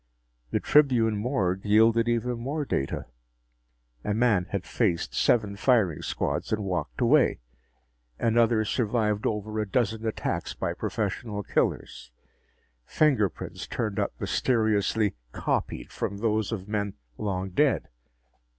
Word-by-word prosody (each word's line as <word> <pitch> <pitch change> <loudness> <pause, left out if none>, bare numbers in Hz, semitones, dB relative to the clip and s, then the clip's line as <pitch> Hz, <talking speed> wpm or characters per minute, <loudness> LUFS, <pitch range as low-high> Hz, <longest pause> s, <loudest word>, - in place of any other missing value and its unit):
The - - 0
Tribune 125 -7 +4
morgue 100 -5 -1
yielded 115 +2 +4
even 120 +1 0
more 145 +5 -2
data. 70 - -2 1.0
A 105 - -1
man 110 -6 +3
had 100 -4 -3
faced 95 -8 0
seven 105 -4 +2
firing 105 - +2
squads - - -2
and 105 -1 0
walked 95 +5 -3
away. 130 +3 +4 0.8
Another 115 -1 +3
survived 105 -2 0
over 110 0 -2
a 105 -2 -2
dozen 110 -1 0
attacks 110 - -3
by - - -2
professional 105 -3 -3
killers. 60 - -1 0.7
Fingerprints 125 - 0
turned 105 -4 -2
up - - -1
mysteriously 110 -3 +1 0.2
"copied" - - -2
from 100 - -3
those 110 0 0
of 100 -4 -4
men 105 -2 -2 0.2
long 95 -2 -2
dead. 140 +6 +2
110 Hz, 120 wpm, -27 LUFS, 100-120 Hz, 1.0 s, Tribune